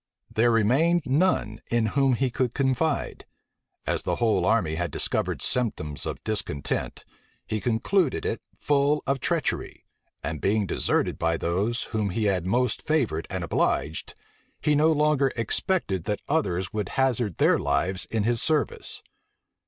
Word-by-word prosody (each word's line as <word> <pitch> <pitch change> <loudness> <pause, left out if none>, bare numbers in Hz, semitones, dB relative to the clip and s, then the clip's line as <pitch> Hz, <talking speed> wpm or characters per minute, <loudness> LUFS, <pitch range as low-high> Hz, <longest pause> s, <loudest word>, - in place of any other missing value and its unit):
There 120 +2 +3
remained 135 +10 +3
none 130 - +1
in 120 -1 +2
whom 135 -2 +3
he 130 +1 0
could 125 -1 -1
confide. 135 +2 -1 0.6
As - - 0
the - - -1
whole 115 -2 +1
army 95 -8 +2
had 85 +1 -2
discovered - - -1
symptoms 90 -12 -1
of - - -5
discontent, 90 -10 -2 0.4
he 110 -1 -3
concluded 130 - +1
it 110 - -2 0.2
full 145 +1 +1
of 135 0 0
treachery; - - -2 0.4
and 80 +1 -4
being 105 +1 +2
deserted - - 0
by 80 0 +1
those 100 +10 -1
whom 105 -2 0
he 110 +4 -2
had 95 -4 +1
most 125 +5 +1
favored 125 - 0
and 95 -2 -3
obliged, 80 -1 -1 0.4
he 150 - +2
no 155 +2 +4
longer 150 -3 +2
expected 115 - 0
that 105 - -2
others 95 - 0
would 105 -4 -2
hazard 125 -8 +1
their - - +3
lives 95 +1 0
in 110 -2 -1
his 115 +1 +2
service. 155 -2 +1
115 Hz, 145 wpm, -26 LUFS, 95-140 Hz, 0.6 s, no